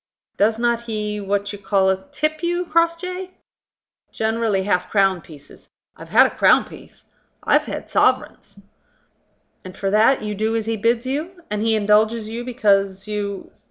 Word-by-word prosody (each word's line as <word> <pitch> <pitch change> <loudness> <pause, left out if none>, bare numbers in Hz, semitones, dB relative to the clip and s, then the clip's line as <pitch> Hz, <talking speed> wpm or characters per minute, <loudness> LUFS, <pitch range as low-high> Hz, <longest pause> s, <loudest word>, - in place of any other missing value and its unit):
Does 220 +2 +2
not 235 0 0
he 210 -2 -4
what 200 +1 -2
you 205 - -8
call 190 -1 +2 0.2
tip 305 +2 -1
you, 350 +1 -1
Crossjay?" 335 +3 -1 0.8
"Generally 220 -3 0
half 180 -2 0
crown 195 -3 +2
pieces. 150 -3 -16 0.3
I've - - -12
had - - +6
a - - -3
crown - - +4
piece. - - -16 0.3
I've - - +3
had - - -6
sovereigns." - - 0 1.0
"And 185 0 -11
for 195 -1 -2
that 220 +5 +3
you 210 0 -3
do 220 +2 -1
as 225 -1 -1
he 225 0 -1
bids 230 +3 0
you? 325 +7 -4
And 210 0 -2
he 225 0 +2
indulges 215 +1 +2
you 230 +2 -5
because 200 -6 0
you 205 -2 -4
215 Hz, 160 wpm, -21 LUFS, 200-240 Hz, 1.0 s, had